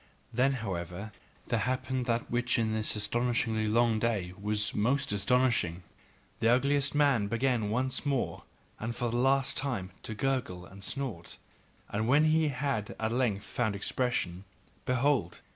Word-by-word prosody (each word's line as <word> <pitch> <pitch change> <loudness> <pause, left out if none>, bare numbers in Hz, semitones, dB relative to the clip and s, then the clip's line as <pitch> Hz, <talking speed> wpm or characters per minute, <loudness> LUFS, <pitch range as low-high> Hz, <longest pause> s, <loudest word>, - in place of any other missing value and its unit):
Then, 130 +4 +3
however, 100 -3 -4 0.4
there 115 - +2
happened 130 +2 -1
that 115 0 -1
which 120 +1 +1
in 110 -2 +1
this 110 0 +1
astonishing 110 0 0
long 115 -1 +3
day 105 -6 -1
was 105 +1 0
most 135 +4 +1
astonishing: 105 -5 +1 0.6
the 115 - +3
ugliest 140 +3 +2
man 140 -8 +3
began 115 -1 +1
once 130 +4 0
more 140 -3 -1 0.4
and 115 +2 -3
for 120 0 -1
the 120 - 0
last 135 +2 +2
time 120 -10 -2
to 110 - -5
gurgle 120 -8 -1
and 95 +2 -12
snort, 115 -9 -4 0.5
and 110 +2 -2
when 145 +5 +5
he 155 0 +3
had 135 -6 -2
at 110 0 0
length 115 -5 0
found 110 -5 -1
expression, 100 -4 -1 0.4
behold! 125 -7 +1
120 Hz, 145 wpm, -30 LUFS, 105-130 Hz, 0.6 s, when